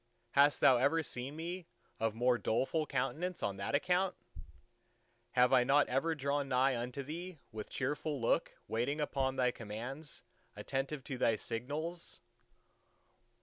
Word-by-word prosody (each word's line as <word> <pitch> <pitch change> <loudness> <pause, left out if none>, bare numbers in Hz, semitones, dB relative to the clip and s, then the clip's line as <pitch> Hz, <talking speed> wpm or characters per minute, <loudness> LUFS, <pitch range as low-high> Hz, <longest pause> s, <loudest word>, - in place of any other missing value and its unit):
Hast 145 +1 +5
Thou 130 -2 +7
ever 145 +6 +3
seen 130 +1 -4
me 170 +2 -5 0.3
of 115 -1 0
more 120 +1 +3
doleful 150 +7 0
countenance 155 +7 -2
on 100 -1 -1
that 100 +7 -1
account? 180 +4 +2 1.2
Have 125 +1 +5
I 125 -2 +6
not 140 +3 +4
ever 160 +6 +1
drawn 140 -1 -1
nigh 130 +1 +3
unto 125 +3 -3
Thee 170 +5 -6
with 110 -1 -6
cheerful 145 +2 -2
look, 115 - +1
waiting 125 +7 -1
upon 135 -3 0
Thy 125 -1 +3
commands, 120 +8 -6 0.3
attentive 135 +1 -3
to 130 -1 -5
Thy 115 - +3
signals? 145 +11 -4
135 Hz, 140 wpm, -34 LUFS, 125-155 Hz, 1.2 s, Thou